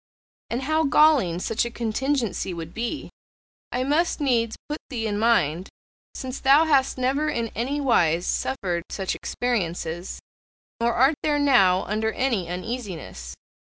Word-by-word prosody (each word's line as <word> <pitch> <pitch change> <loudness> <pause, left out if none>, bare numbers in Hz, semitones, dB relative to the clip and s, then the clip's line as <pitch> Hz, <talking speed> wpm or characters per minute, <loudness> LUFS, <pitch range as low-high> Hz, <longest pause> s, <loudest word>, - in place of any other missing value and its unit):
And 240 +3 -2
how 310 +3 +1
galling 280 - +4
such 220 +5 0
a 235 - -3
contingency 235 -4 -2
would 165 0 -7
be, 240 +6 -4 0.6
I 250 +1 -1
must 310 +7 +1
needs 235 -6 +1
put 300 +1 -4
thee 235 -5 -3
in 205 -1 -1
mind, 185 -7 +2 0.5
since 260 0 -5
thou 280 +4 +5
hast 275 -5 +2
never 275 +4 +1
in 230 -4 -2
any 260 +7 -2
wise 180 - +2
suffered 185 -10 -1
such 190 -2 -2
experiences, 175 -7 -3 0.6
nor 235 0 +1
art 265 +5 +4
thou 300 -1 +1
now 195 -11 +4
under 220 +2 -1
any 230 -10 -1
uneasiness. 180 - -6
235 Hz, 140 wpm, -24 LUFS, 185-270 Hz, 0.6 s, thou